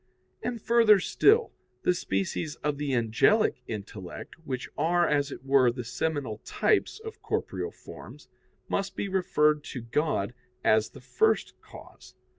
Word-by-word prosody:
And, 245 -1 -3
further 225 -2 +5
still, 445 - +3 0.3
the 180 - +3
species 150 - -2
of 145 -1 -1
the 145 -2 -2
angelic 120 - +2
intellect, 100 -4 -7
which 130 -4 -4
are, 175 +1 +2
as 145 -1 +1
it 135 - -9
were, 135 -3 +4
the 125 +1 -6
seminal 130 -3 -3
types 430 - 0
of 445 0 -9
corporeal - - -3
forms, - - -12 0.4
must 195 -1 -2
be - - -2
referred 150 -6 +2
to 130 - -6
God 115 -3 -1 0.3
as 110 0 +3
the - - -14
first 440 - +1
cause. - - -14
150 Hz, 140 wpm, -28 LUFS, 120-190 Hz, 0.4 s, further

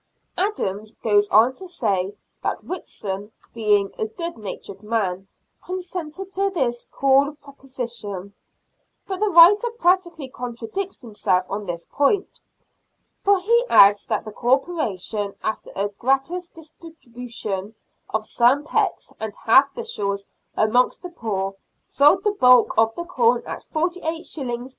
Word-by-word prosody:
Adams 220 - -2
goes 205 -2 +3
on 225 +5 +5
to 375 +7 -8
say 205 - -1 0.3
that - - -3
Whitson, 205 - -5 0.2
being 210 -3 +1
a 220 - 0
good 335 +9 -6
natured 200 -2 -8
man, 195 -4 -2 0.4
consented 365 0 -5
to 395 +1 +1
this 250 -10 -1
cool 275 +2 +2
pro 285 -1 -16
position; 235 -8 -5 0.7
but 380 -1 -4
the 425 0 +2
writer 395 +7 +7
practically 345 - +1
contradicts 250 - -5
himself 195 -5 0
on 200 0 -4
this 170 -1 -4
point, 295 +8 0 0.8
for 400 0 +5
he 470 +6 +3
adds 200 +1 +6
that 215 0 -1
the 215 - -7
Corporation, 235 - -1
after 220 - -3
a 200 +1 -1
gratis 270 - -1
distribution 245 - -7 0.3
of 220 0 -2
some 250 +6 +3
pecks 305 - -1
and 220 -2 -5
half 270 +5 +6
bushels 200 - -2 0.3
amongst 245 +9 +2
the 360 - -6
poor, 195 - -3 0.3
sold 295 +7 +4
the 420 - +2
bulk 250 - +5
of 225 0 +4
the 345 - -5
corn 465 +6 +2
at - - -6
48s. 320 -7 -2
250 Hz, 130 wpm, -22 LUFS, 210-345 Hz, 0.8 s, writer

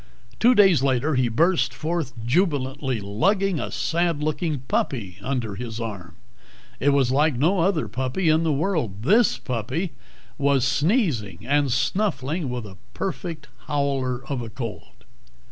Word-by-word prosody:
Two 245 +2 +5
days 195 - +6
later 135 +3 +1
he 130 -2 +2
burst 125 -2 +2
forth 155 -2 -2
jubilantly, 135 - 0
lugging 185 - +1
a - - -3
sad 165 -2 0
looking 155 -2 -1
puppy 105 -7 -2
under 115 -2 -2
his 115 +1 -6
arm. 100 -7 -6 0.6
It 140 - +3
was 140 -3 +3
like 150 +1 +3
no 175 +9 +2
other 165 - +1
puppy 130 - -2
in 155 +1 +4
the 165 -1 +1
world. 140 - -1
This 215 - +4
puppy 130 - -3 0.5
was 140 -2 +3
sneezing 135 - 0
and 140 0 +2
snuffling 160 - 0
with 125 -2 -4
a 95 -3 -11 0.2
perfect 165 -5 -4 0.2
howler 135 -3 -1
of 135 -3 -3
a 115 - -6
cold. 115 -1 -8
140 Hz, 145 wpm, -24 LUFS, 120-165 Hz, 0.6 s, days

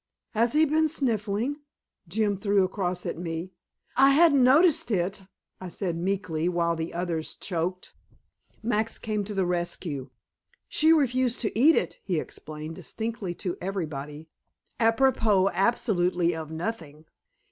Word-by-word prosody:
"Has 230 +1 +1
he 310 +1 +5
been 315 +1 +2
sniffling?" 235 -3 -1 0.5
Jim 205 +3 0
threw 200 0 +2
across 185 -1 -2
at - - -4
me. 170 +1 -4 0.4
"I 270 +1 +6
hadn't 285 -2 +5
noticed 290 +3 +5
it," 195 -1 -1 0.3
I 185 - -7
said 175 -1 -3
meekly, 175 -2 -1
while 170 -1 +1
the 165 0 -4
others 170 -2 -3
choked. 180 0 -3 0.7
Max 225 0 0
came 215 -2 -2
to 210 +1 -6
the 190 -1 +1
rescue. 175 -6 -3 0.6
"She 315 +1 +3
refused 255 -5 +2
to 215 - -2
eat 290 +9 +6
it," - - -1
he 175 -5 0
explained, 155 +1 -8
distinctly 220 -5 -4
and - - -24
to 180 - -3
everybody, 155 -5 -5 0.5
apropos 225 -4 +3
absolutely 180 -4 +1
of 160 -1 -6
nothing. 160 -3 -5
195 Hz, 135 wpm, -27 LUFS, 170-230 Hz, 0.7 s, I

